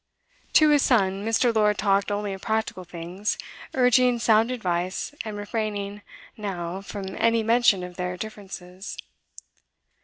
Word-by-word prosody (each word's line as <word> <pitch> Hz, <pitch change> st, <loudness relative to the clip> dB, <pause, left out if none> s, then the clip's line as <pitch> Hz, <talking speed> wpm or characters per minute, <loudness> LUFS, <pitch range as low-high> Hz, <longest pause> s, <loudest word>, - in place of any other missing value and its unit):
To 310 Hz, -1 st, +7 dB
his 295 Hz, -1 st, +5 dB
son, 195 Hz, -6 st, +2 dB
Mr. 230 Hz, +2 st, +2 dB
Lord 210 Hz, -2 st, +3 dB
talked 200 Hz, 0 st, +2 dB
only 205 Hz, -1 st, -2 dB
of 190 Hz, -, -8 dB
practical 220 Hz, -4 st, -2 dB
things, 175 Hz, +4 st, -4 dB, 0.4 s
urging 250 Hz, -1 st, +4 dB
sound 225 Hz, 0 st, +4 dB
advice, 185 Hz, -2 st, -2 dB
and 215 Hz, -2 st, -5 dB
refraining, 205 Hz, -1 st, -3 dB, 0.3 s
now, 190 Hz, -3 st, -4 dB
from 195 Hz, -1 st, -6 dB
any 230 Hz, -1 st, +3 dB
mention 230 Hz, -4 st, +4 dB
of 180 Hz, -1 st, -8 dB
their 180 Hz, 0 st, -3 dB
differences. 190 Hz, -2 st, -8 dB
205 Hz, 130 wpm, -25 LUFS, 190-225 Hz, 0.4 s, To